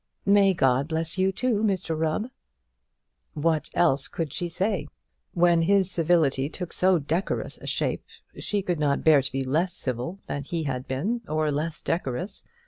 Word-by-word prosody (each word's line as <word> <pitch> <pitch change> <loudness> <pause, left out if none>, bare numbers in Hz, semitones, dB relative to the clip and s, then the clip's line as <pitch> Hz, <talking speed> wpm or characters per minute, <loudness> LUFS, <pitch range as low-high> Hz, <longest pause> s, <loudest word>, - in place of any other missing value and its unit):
"May 200 -1 +5
God 135 -2 +2
bless 160 +2 -2
you, 190 +1 +3
too, 230 +1 0
Mr 190 -6 0
Rubb!" 160 +10 -1 1.0
What 155 0 0
else 140 -5 +3
could 160 -5 -4
she 175 - -3
say? 185 -3 -1 0.5
When 175 -1 +4
his 190 +2 +2
civility 155 -6 +2
took 180 +1 -6
so 185 0 +3
decorous 160 +5 -2
a - - -10
shape, - - -1 0.4
she 205 -2 -1
could 175 -4 -1
not 145 -2 +1
bear 155 -3 +6
to 135 - -3
be 135 0 -1
less 165 +8 0
civil 130 +5 -3
than 140 - -4
he 165 +3 -3
had 130 -3 -3
been, 200 - -1
or 155 0 0
less 155 +2 -3
decorous. 165 - -2
165 Hz, 165 wpm, -26 LUFS, 145-185 Hz, 1.0 s, bear